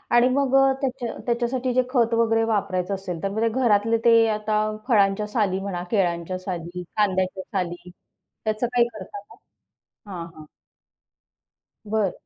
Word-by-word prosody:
आणि 240 +1 +6
मग 270 0 +1
अ, 270 - +7 0.2
त्याच्या 250 -3 -3
त्याच्यासाठी 245 +1 -1
जे 255 - +4
खत 235 -3 +2
वगैरे 225 -1 +3
वापरायचं 200 -2 -1
असेल, 180 -4 -6
तर 195 - 0
म्हणजे 220 +3 0
घरातले 225 -2 +2
ते 230 -1 +6
आता 215 0 -1 0.3
फळांच्या 210 -3 +3
साली 205 -4 0
म्हणा, 195 -3 -4
केळाच्या 180 -3 0
साली, 180 -1 -5
कांद्याच्या 190 -2 +1
साली, 175 -1 -4 0.6
त्याचं 215 +2 0
काही 245 -1 +2
करता 215 -3 -9
मग? - - -16 0.7
हां, 170 -3 -6
हां. 155 - -11 1.4
बरं. 210 -3 +1
210 Hz, 140 wpm, -24 LUFS, 185-235 Hz, 1.4 s, अ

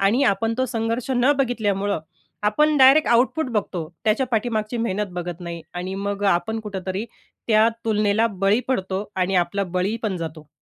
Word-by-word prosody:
आणि 205 +7 +3
आपण 225 +3 +1
तो 260 - +2
संघर्ष 230 +1 -2
न 250 +4 +4
बघितल्यामुळं, 205 -7 0 0.4
आपण 300 +9 +3
डायरेक्ट 270 +4 +7
आउटपुट 255 +6 +3
बघतो. 185 -6 -2 0.2
त्याच्या 225 +4 +2
पाठीमागची 225 -1 -1
मेहनत 210 -3 -1
बघत 175 -1 -5
नाही. 170 -1 -6
आणि 180 +2 -4
मग 200 +1 -3
आपण 220 +5 -2
कुठेतरी 195 -1 -4 0.4
त्या 220 0 +5 0.2
तुलनेला 215 0 +2
बळी 200 +4 +3
पडतो 190 -5 -1
आणि 185 +1 0
आपला 180 +3 +1
बळी 185 +4 -1
पण 210 -4 -1
जातो. 160 -2 -7
210 Hz, 160 wpm, -23 LUFS, 190-230 Hz, 0.4 s, डायरेक्ट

